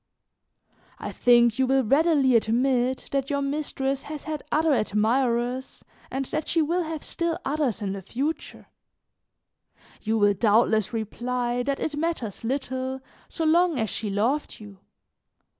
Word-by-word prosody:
"I - - -6
think 240 -1 +4
you 260 - +3
will 265 0 +3
readily 275 0 +3
admit 245 +3 +1
that 275 -1 -1
your 280 -1 0
mistress 275 -1 -2
has 300 -1 -7
had 310 -1 -4
other 310 0 +3
admirers 240 +3 0 0.3
and 270 +1 -2
that 310 +4 -3
she 330 - +1
will 335 +3 +1
have 320 -2 -5
still 335 -1 -2
others 275 -7 -1
in 195 -1 -2
the 195 - -6
future; 275 - -4 1.4
you 220 +1 0
will 205 -1 +4
doubtless 215 0 +3
reply 240 +2 -2
that 275 +2 -2
it 315 - -2
matters 295 - -3
little, 260 +1 -2 0.3
so 325 - -3
long 335 0 +3
as 220 -3 -1
she 210 - -3
loved 230 +9 -1
you. 205 -3 -12
260 Hz, 140 wpm, -25 LUFS, 230-295 Hz, 1.4 s, think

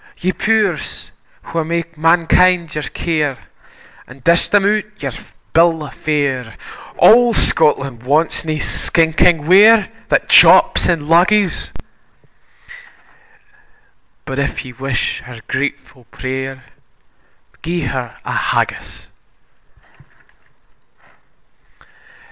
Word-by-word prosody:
Ye 185 - -1
pow'rs 210 -4 -2 0.4
wha 165 -1 -1
mak 170 +1 -4
mankind 170 +1 +2
your 150 -1 -4
care, 150 -5 -3 0.7
And 125 0 -16
dish 170 +1 +2
them 205 -1 +2
out 210 +1 +1
their - - -4 0.4
bill 165 -1 +3
o' 145 - -9
fare, 135 -7 -3 0.4
Auld 240 0 +5
Scotland 140 -6 0
wants 150 +6 0
nae 155 -1 -3
stinking 160 +1 +1
ware 210 +5 +5 0.2
That - - +1
jaups - - +5
in 170 -3 0
luggies; 180 +3 +2 2.6
But, 135 +1 -5
if 140 0 -3
ye 125 - -10
wish 130 -1 -3
her 120 -2 -11
gratefu' 130 -2 -5
pray'r, 130 +1 -6 1.0
Gie 170 +3 -3
her 125 -3 -5
a - - -5
Haggis! - - -3
160 Hz, 95 wpm, -16 LUFS, 135-175 Hz, 2.6 s, Auld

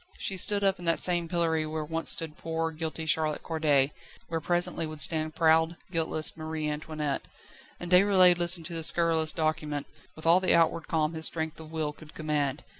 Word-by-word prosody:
She 195 - -3
stood 200 +2 +1
up 195 -1 +1
in 175 - -9
that 165 0 +2
same 175 -2 +3
pillory 165 -2 0
where 155 0 -4
once 165 +1 -2
stood 160 -2 +2
poor, 165 0 -3
guilty 160 0 -5
Charlotte 155 -1 -1
Corday, 150 -4 +1 0.4
where 165 -1 -3
presently 175 0 0
would 155 -1 -9
stand 155 0 +3
proud, 160 0 +2
guiltless 160 -2 0
Marie 155 -1 -5
Antoinette. 150 -1 -4 0.6
And 175 0 -8
Déroulède 185 -1 +5
listened 175 -1 +5
to 170 - -3
the 165 -1 -4
scurrilous 160 -1 +3
document, 155 -2 -2 0.3
with 155 - -11
all 170 +2 +5
the 185 -2 +2
outward 165 -1 +1
calm 155 0 -1
his 160 0 -1
strength 160 0 -5
of 160 -1 -11
will 155 -2 -3
could 155 +1 -16
command. 150 -2 -2
160 Hz, 190 wpm, -27 LUFS, 155-170 Hz, 0.6 s, Déroulède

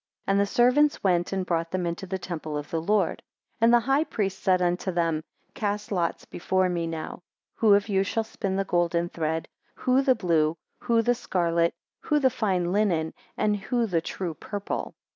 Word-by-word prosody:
3 - - +1
And 200 - +3
the 200 - +2
servants 255 +7 +3
went 175 -3 +2
and 190 -1 -1
brought 165 -2 -1
them 185 0 -2
into 170 +3 -4
the 190 - -2
temple 160 -4 -5
of 145 0 -6
the 165 - -1
Lord, 200 +1 +1 0.4
and 230 +1 +5
the 240 0 +6
high 270 +5 +2
priest 195 -10 -2
said 185 -1 +3
unto 180 +1 0
them, 165 -3 0 0.3
Cast 210 0 -3
lots 175 -4 -1
before 185 +1 0
me 170 -2 -1
now, 160 +1 -5 0.3
who 215 -3 +5
of 200 +1 +1
you 195 -2 +2
shall 225 +3 -1
spin 200 -3 -3
the 195 0 0
golden 175 -1 +1
thread, 160 -1 -2 0.3
who 255 +1 +2
the 265 -2 +3
blue, 165 -5 +1 0.2
who 230 -1 +2
the 245 - +3
scarlet, 170 -8 0 0.2
who 300 - +1
the 265 -3 +3
fine 190 -7 0
linen, 180 -6 +1 0.2
and 210 -1 +2
who 235 +4 0
the 175 -6 0
true 175 0 -4
purple. 200 +5 -5
190 Hz, 195 wpm, -26 LUFS, 170-215 Hz, 0.4 s, the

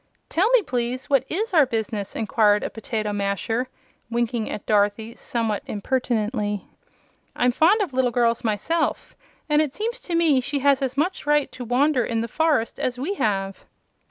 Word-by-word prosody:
"Tell 375 +7 +2
me, - - +4
please, 250 0 -3
what 270 -2 +3
IS 420 +5 -2
our 305 -6 +5
business?" 220 -4 -3
inquired 210 -2 +2
a - - -3
potato 215 -2 -3
masher, 205 +5 -1 0.4
winking 235 -1 -1
at 205 - -6
Dorothy 210 +2 +1
somewhat 225 -3 -2
impertinently. 215 -2 -1 0.7
"I'm 245 0 +2
fond 350 - +4
of 360 -9 -2
little 255 -1 +2
girls, 235 -1 +1
myself, 275 +10 -1 0.3
and 300 0 +3
it 295 -3 -2
seems 460 +3 -3
to 345 - -4
me 315 -6 +4
she 280 +3 -2
has 280 0 +3
as 265 0 -2
much 315 +1 -1
right 295 -1 +2
to 250 - -8
wander 255 +2 +2
in 225 -1 -1
the 230 - -3
forest 295 -3 0
as 250 -1 -1
we 295 +10 -2
have." 195 - -2
245 Hz, 170 wpm, -23 LUFS, 220-295 Hz, 0.7 s, our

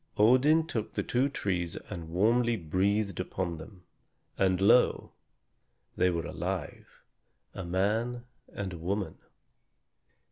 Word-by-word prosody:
Odin 130 +9 +5
took 115 -10 -4
the - - 0
two 130 +3 +1
trees 90 -9 -2 0.2
and 85 -5 -6
warmly 115 +7 +2
breathed 100 +3 0
upon 90 -2 -3
them; 90 +3 -12 0.5
and 95 -2 +2
lo! 105 +6 +4 0.8
they 90 - +3
were 85 -2 -2
alive, - - -4 0.7
a 95 - -6
man 110 +7 0 0.3
and 95 -3 -5
a 85 - -8
woman. 95 +4 -3
100 Hz, 115 wpm, -29 LUFS, 90-115 Hz, 0.8 s, Odin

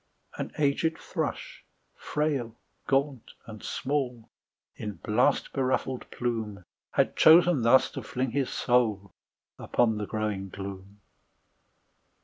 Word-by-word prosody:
An - - -5
aged 155 +3 +1
thrush, - - -4 0.3
frail, 140 -7 -2 0.3
gaunt 135 -3 0
and 110 -2 -10
small, 130 -4 -3 0.5
With 105 -5 -6
blast 110 +4 +2
beruffled 130 -1 -1
plume, 110 -5 -3 0.3
Had - - +2
chosen 170 -2 +6
thus 120 +3 +5
to 135 - -5
fling 125 +3 -3
his 140 0 0
soul 110 -5 +1 0.5
Upon 110 -3 +1
the 105 - -3
growing 105 -3 -3
gloom. 100 +1 -8
120 Hz, 110 wpm, -28 LUFS, 105-135 Hz, 0.5 s, chosen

